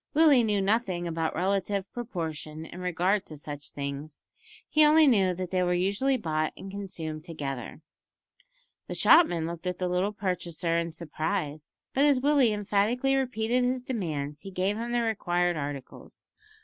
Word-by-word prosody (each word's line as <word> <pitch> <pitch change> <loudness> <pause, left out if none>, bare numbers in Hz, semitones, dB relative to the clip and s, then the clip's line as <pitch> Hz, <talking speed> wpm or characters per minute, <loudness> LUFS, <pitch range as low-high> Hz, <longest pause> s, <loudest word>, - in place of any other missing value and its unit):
Willie 295 -6 +6
knew 210 -3 +1
nothing 195 -4 0
about 165 -1 -2
relative 195 +2 -1
proportion 160 -9 -5
in 175 - -10
regard 180 +3 +1
to 155 - -9
such 145 0 -7
things; 140 +1 -6 0.4
he 305 - +4
only 310 +1 +7
knew 195 -9 +4
that 185 0 -5
they 185 -1 +1
were 180 0 +2
usually 200 +9 +1
bought 155 -7 -1
and 195 - -8
consumed 170 -6 -6
together. 145 -5 -6 1.1
The - - -4
shopman 175 - +5
looked 170 +2 -5
at 180 -1 -2
the 180 - -1
little 180 +3 0
purchaser 180 -4 -2
in 170 0 0
surprise, 155 -1 -4 0.2
but 275 - +3
as 285 -3 +4
Willie 275 -3 +4
emphatically 210 +6 +1
repeated 250 -2 0
his 250 0 0
demands 155 - -3
he 195 - -9
gave 190 +2 0
him 235 +2 -4
the 240 0 +1
required 175 -6 0
articles. 140 -3 -7
185 Hz, 160 wpm, -28 LUFS, 160-225 Hz, 1.1 s, only